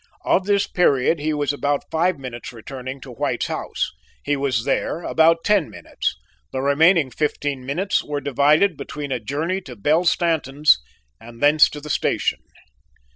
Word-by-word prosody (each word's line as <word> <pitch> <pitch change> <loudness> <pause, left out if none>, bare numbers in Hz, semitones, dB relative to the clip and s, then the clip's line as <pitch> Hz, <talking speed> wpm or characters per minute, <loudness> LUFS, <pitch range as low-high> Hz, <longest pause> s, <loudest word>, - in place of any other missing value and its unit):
Of 190 - +2
this 200 -1 +3
period, 145 -2 +2
he 155 +2 -1
was 145 -2 0
about 145 0 -2
five 170 +2 +1
minutes 125 -3 -8
returning 130 +3 -8
to 130 - -10
White's 120 - -2
house; - - -3 0.3
he 145 - 0
was 135 -5 -1
there 170 - -1
about 165 +1 +3
ten 205 -7 +2
minutes; - - -4 0.4
the - - -3
remaining 145 +2 +3
fifteen 145 -3 -2
minutes 185 +7 0
were 145 -1 -3
divided 145 +6 +2
between 145 -1 -6
a 130 - -1
journey 155 - -2
to 130 -8 -10
Belle 155 - +1
Stanton's 155 - +3 0.4
and 115 0 -13
thence 145 +2 +5
to 150 - -8
the 150 0 -6
station. - - 0
145 Hz, 160 wpm, -21 LUFS, 135-165 Hz, 0.4 s, thence